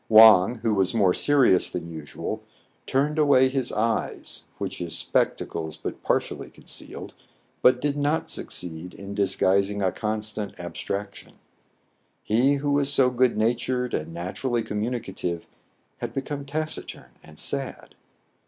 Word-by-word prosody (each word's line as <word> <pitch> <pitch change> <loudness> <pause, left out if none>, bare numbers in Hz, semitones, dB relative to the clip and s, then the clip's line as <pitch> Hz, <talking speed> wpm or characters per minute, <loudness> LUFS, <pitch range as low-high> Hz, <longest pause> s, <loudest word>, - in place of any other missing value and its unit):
Wang, 110 -1 +8
who 115 - +2
was 95 +2 +1
more 95 -5 +4
serious 135 -10 +4
than 85 -1 -5
usual, 80 -3 -5 0.5
turned 145 +4 +1
away 135 -3 +5
his 130 -2 -1
eyes, 110 +1 -2
which - - -4
his 85 -2 -1
spectacles 80 -1 -1
but - - -6
partially - - -1
concealed, - - -7 0.5
but 125 0 +5
did 145 +1 0
not 145 +2 0
succeed 85 0 -3
in 100 0 -8
disguising 100 0 +2
a 95 - +2
constant 110 -1 -2
abstrac 100 +3 -4
tion. - - -13 0.9
He 125 +6 +3
who 145 +1 -1
was 140 0 +2
so 135 -2 +4
good 125 -2 +2
natured 120 +3 0
and 75 - -2
naturally 110 +8 -2
communicative 105 -6 -3 0.5
had - - -5
become 140 +1 -4
taciturn 150 - -4
and 75 0 -15
sad. 135 +6 -2
110 Hz, 135 wpm, -25 LUFS, 95-135 Hz, 0.9 s, Wang